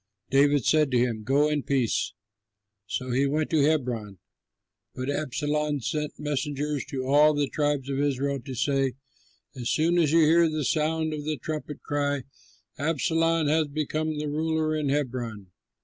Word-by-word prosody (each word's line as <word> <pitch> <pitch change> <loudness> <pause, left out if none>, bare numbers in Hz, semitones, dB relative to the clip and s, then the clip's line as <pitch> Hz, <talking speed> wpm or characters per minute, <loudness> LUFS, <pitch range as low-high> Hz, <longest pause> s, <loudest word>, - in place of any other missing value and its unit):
David 140 -1 +4
said 155 -2 +3
to 125 - +2
him, 120 -2 0
"Go 140 +5 +3
in 150 -1 0
peace." 130 -4 0 0.7
So 125 +4 -3
he 135 +3 +2
went 155 +2 -1
to 155 -3 +3
Hebron; 125 -9 0 0.8
but 130 +2 -2
Absalom 150 +1 -1
sent 150 +5 -3
messengers 145 -1 -2
to 130 -1 -4
all 150 +3 +5
the 145 -1 +1
tribes 145 -2 -1
of 135 -1 -2
Israel 140 -1 0
to 130 0 -7
say, 135 0 +1 0.6
"As 120 -2 -3
soon 170 +3 +2
as 155 -4 +3
you 165 +1 +5
hear 165 +2 +5
the 155 -2 -2
sound 155 +1 0
of 150 -1 -4
the 155 0 -2
trumpet, 150 -2 -6
cry, 145 -2 -1 0.6
'Absalom 165 +2 +1
has 155 +1 +2
become 155 +1 -2
ruler 155 +1 -1
in 150 -2 -1
Hebron.'" 120 -8 -3
145 Hz, 155 wpm, -26 LUFS, 135-155 Hz, 0.8 s, all